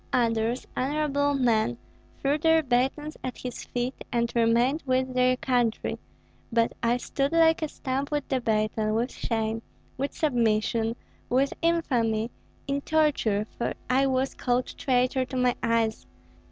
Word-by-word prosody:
Others, 230 0 +1
honorable 285 +1 +1
men, 225 - +2 0.4
threw 285 +2 0
their 320 0 +4
batons 270 +4 0
at 255 - -4
his 250 -1 -6
feet 245 +1 -2 0.2
and 235 -1 0
remained 235 +6 +3
with 260 -1 0
their 255 0 +3
country; 245 -4 0 0.5
but 230 0 +2
I 235 +1 +2
stood 275 +4 -2
like 325 -1 +4
a 310 - 0
stump 275 -1 -3
with 295 -2 -2
the 260 -2 0
baton, 215 -1 0
with 240 +3 0
shame, 225 -1 -2 0.4
with 275 +2 -2
submission, 230 -4 +1 0.3
with 270 +2 +2
infamy, 240 -10 +1 0.3
in 280 0 -1
torture, 280 -10 +1
for - - -1 0.2
I 270 +2 +4
was 260 0 0
called 245 0 -1
traitor 255 0 +1
to 260 0 -5
my 250 -1 +3
eyes. 230 -1 0
250 Hz, 140 wpm, -27 LUFS, 230-275 Hz, 0.5 s, their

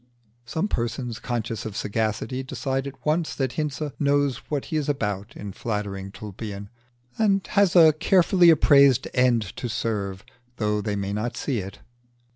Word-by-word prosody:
Some 160 - -1
persons 120 - -3
conscious 115 -3 -3
of 110 -2 -6
sagacity 110 +4 -2
decide 135 +1 -3
at 140 - -11
once 155 +2 0
that 130 -3 -1
Hinze 150 0 -3
knows 145 -2 +2
what 145 -3 -2
he - - -5
is 150 -1 -1
about 105 -6 -3
in 100 -1 -6
flattering 100 -3 -4
Tulpian, 100 0 -7 0.5
and 200 -3 +2
has 200 -3 +3
a 160 -3 +8
carefully 175 +2 +4
appraised 140 -4 +5
end 125 -3 +3
to 120 - -4
serve 100 -4 -3 0.3
though 105 -1 0
they 105 -1 -2
may 100 0 -3
not 110 +3 -3
see 130 -6 -1
it. 95 0 -8
120 Hz, 155 wpm, -25 LUFS, 105-145 Hz, 0.5 s, a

